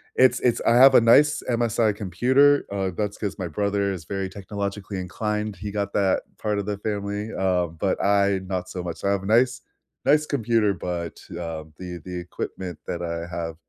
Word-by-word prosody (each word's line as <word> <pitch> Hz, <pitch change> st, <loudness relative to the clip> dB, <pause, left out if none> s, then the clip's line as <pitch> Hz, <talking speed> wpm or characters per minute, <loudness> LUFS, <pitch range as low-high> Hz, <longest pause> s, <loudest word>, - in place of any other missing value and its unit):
it's 130 Hz, 0 st, +5 dB
it's 120 Hz, -2 st, +2 dB
I 115 Hz, -, +5 dB
have 130 Hz, +2 st, +8 dB
a -, -, +7 dB
nice 150 Hz, +6 st, +5 dB
MSI 115 Hz, -2 st, +2 dB
computer, 130 Hz, +9 st, +3 dB
uh, 95 Hz, -2 st, -1 dB
that's 105 Hz, -1 st, -2 dB
'cause 100 Hz, -2 st, -4 dB
my 90 Hz, -, -2 dB
brother 100 Hz, +4 st, 0 dB
is 85 Hz, -5 st, -6 dB
very 95 Hz, 0 st, -3 dB
technologically 100 Hz, 0 st, -5 dB
inclined, 105 Hz, +2 st, -3 dB
he 100 Hz, +3 st, -6 dB
got 100 Hz, -1 st, -2 dB
that 95 Hz, -2 st, +2 dB, 0.2 s
part 105 Hz, -1 st, -1 dB
of 100 Hz, -, -4 dB
the 105 Hz, -1 st, -2 dB
family, 105 Hz, +1 st, -3 dB
uh, 90 Hz, -2 st, +1 dB
but 80 Hz, -1 st, -2 dB
I 100 Hz, -1 st, +3 dB
not 90 Hz, -1 st, -3 dB
so 90 Hz, -1 st, -5 dB
much, 85 Hz, -2 st, -6 dB
I 100 Hz, -, +1 dB
have 100 Hz, -1 st, 0 dB
a -, -, -7 dB
nice 120 Hz, +4 st, +3 dB, 0.4 s
nice 150 Hz, +1 st, +4 dB
computer 115 Hz, -6 st, +1 dB
but, 85 Hz, -2 st, -5 dB
um, 80 Hz, -2 st, -6 dB
the 90 Hz, -1 st, -6 dB
the 90 Hz, -1 st, -6 dB
equipment 90 Hz, 0 st, -6 dB
that 85 Hz, -, -4 dB
I 85 Hz, 0 st, -3 dB
have 80 Hz, -1 st, -4 dB
100 Hz, 195 wpm, -24 LUFS, 90-110 Hz, 0.4 s, have